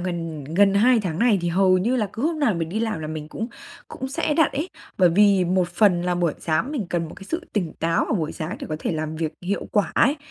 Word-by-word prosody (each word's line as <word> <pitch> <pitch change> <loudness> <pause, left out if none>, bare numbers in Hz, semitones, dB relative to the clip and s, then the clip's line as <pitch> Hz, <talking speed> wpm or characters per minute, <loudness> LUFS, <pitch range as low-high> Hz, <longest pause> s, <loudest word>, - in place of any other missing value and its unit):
gần 165 -4 -4
gần 195 +7 +3
2 235 +4 +5
tháng 175 -5 -3
này 230 -3 +4
thì 175 - -1
hầu 185 +1 +4
như 235 +7 +1
là 215 -4 +1
cứ 225 - -5
hôm 320 +1 0
nào 260 -10 +2
mình 165 -1 -2
đi 210 +6 -2
làm 220 -7 -2
là 155 - -4
mình 155 -1 -6
cũng 225 - -4 0.4
cũng 265 - -6
sẽ 290 +2 -1
đặt 320 -4 +3
ấy, 300 +6 -2 0.3
bởi 180 - +6
vì 195 +1 +4
một 180 0 +1
phần 175 0 +3
là 180 0 0
buổi 175 -3 +1
sáng 170 - -1
mình 240 -11 -2
cần 170 -2 -1
một - - -10
cái 195 - -11
sự 330 - -4
tỉnh 180 -7 -1
táo 165 +1 +1
vào - - -1
buổi 160 -6 -2
sáng 165 +6 -5
để - - -6
có 155 - -1
thể - - -2
làm 155 0 -3
việc 160 -1 -2
hiệu 200 +3 -2
quả 205 - +2
ấy. 285 - +4
185 Hz, 275 wpm, -23 LUFS, 165-220 Hz, 0.4 s, bởi